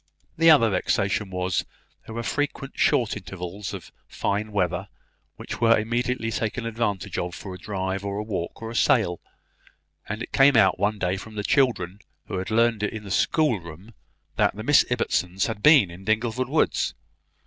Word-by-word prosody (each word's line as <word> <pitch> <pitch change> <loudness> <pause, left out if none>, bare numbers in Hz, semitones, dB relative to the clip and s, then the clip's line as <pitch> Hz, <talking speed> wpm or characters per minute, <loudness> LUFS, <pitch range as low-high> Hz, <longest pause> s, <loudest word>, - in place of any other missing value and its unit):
The 165 +1 +5
other 115 -9 +6
vexation 100 +1 0
was, 90 -1 -1
that - - -5 0.4
there 110 - -8
were 115 - -3
frequent 145 +1 -2
short - - +2
intervals 95 +2 -6
of - - -8 0.2
fine 105 +2 -2
weather, 95 -1 -1 0.5
which - - -7
were 115 -1 +5
immediately 115 +1 -1
taken 115 +2 -2
advantage 115 -4 -2
of 90 0 -4
for 95 - -8
a 90 - -9
drive, 95 0 -3
or 100 0 -3
a 105 - -2
walk, 100 -1 -5
or 115 - -5
a - - -8
sail; 90 -4 +2 0.9
and 105 +2 -3
it - - -9
came 135 -2 +6
out 95 -4 +4
one 105 +1 +1
day 95 -1 -1
from 110 +2 -10
the 105 - -3
children, 105 - +1 0.3
who 95 - -4
had 95 - -5
learned 115 -1 +2
it 105 - -1
in 110 -1 -6
the 100 - -8
schoolroom, 100 - 0 0.4
that - - +2
the - - -6
Miss - - +5
Ibbotsons 90 +2 0
had 110 -2 -4
been 135 - +6
in 90 +3 -11
Dingleford 115 +4 0
woods. 155 +2 +1
105 Hz, 180 wpm, -25 LUFS, 95-115 Hz, 0.9 s, other